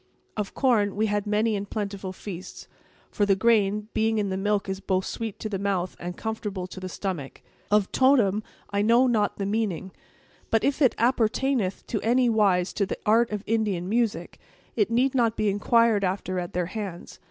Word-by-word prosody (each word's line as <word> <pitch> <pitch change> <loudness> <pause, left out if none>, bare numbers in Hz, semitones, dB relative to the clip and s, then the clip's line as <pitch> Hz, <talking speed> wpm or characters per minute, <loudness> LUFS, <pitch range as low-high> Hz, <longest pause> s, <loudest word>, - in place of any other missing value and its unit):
"Of 210 -2 -4
corn, 220 -7 +2
we 215 +2 +1
had 205 -1 -1
many 215 +1 +1
and 200 0 -4
plentiful 200 -3 -4
feasts; 185 -1 -9 0.4
for 205 - 0
the 200 -1 +4
grain, 210 -1 +2
being 220 0 +1
in 205 -2 0
the 190 - -2
milk 205 +1 0
is 190 0 -3
both 190 -1 -1
sweet 225 -3 -5
to - - -5
the 200 -3 -3
mouth 190 -2 -1
and 175 0 -6
comfortable 210 -4 -4
to 185 +1 -9
the 185 0 -6
stomach. 170 -11 -5 0.3
Of 210 -2 +2
totem, 240 -7 +3 0.3
I 200 0 +1
know 235 +4 +5
not 220 -5 +1
the 200 - -2
meaning; 200 -3 -2 0.6
but 225 - +2
if 280 +2 0
it 260 - +4
appertaineth 235 -2 +1
in 215 - 0
any 245 +2 +3
wise 195 -5 +2
to 200 - 0
the - - -4
art 230 +2 +4
of 210 -1 -4
Indian 210 -6 0
music, 215 -5 -1 0.4
it 210 -2 +2
need 250 +3 +2
not 235 -4 +1
be 215 - +1
inquired 220 +1 +3
after 185 -1 -1
at 175 -1 -5
their 180 0 0
hands. 190 -2 -7
205 Hz, 190 wpm, -26 LUFS, 190-225 Hz, 0.6 s, know